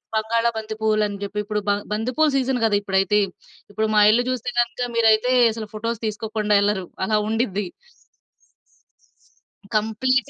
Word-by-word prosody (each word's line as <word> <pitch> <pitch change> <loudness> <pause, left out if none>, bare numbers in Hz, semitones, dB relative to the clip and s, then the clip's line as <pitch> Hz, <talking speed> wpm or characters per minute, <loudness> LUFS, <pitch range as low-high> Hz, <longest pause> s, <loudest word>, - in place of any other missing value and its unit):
బంగాళా 230 +2 +1
బంతి 220 0 -5
పూవ్వులని 215 -2 +1
జెప్పి 205 +1 -3
ఇప్పుడు 210 0 -2
బ 205 - +4 0.2
బంతిపూల 255 +8 +1
సీజన్ 260 -2 0
గదా! 205 -2 +3
ఇప్పుడైతే. 195 +1 +1 0.5
ఇప్పుడు 220 0 0
మా 210 - +6
ఇల్లు 240 +3 +2
చూస్తే 245 -1 -3
గనుక 240 +1 -3
మీరైతే 225 +2 +4 0.2
అసలు 220 -2 -7
ఫోటోస్ 230 +1 -3
తీసుకోకుండా 215 -1 -1
ఎళ్లరు 205 -3 0 0.2
అలా 215 +1 +1
ఉండిద్ది. 210 -4 -1 2.1
కంప్లీట్ 255 +6 +1
220 Hz, 135 wpm, -22 LUFS, 210-235 Hz, 2.1 s, మా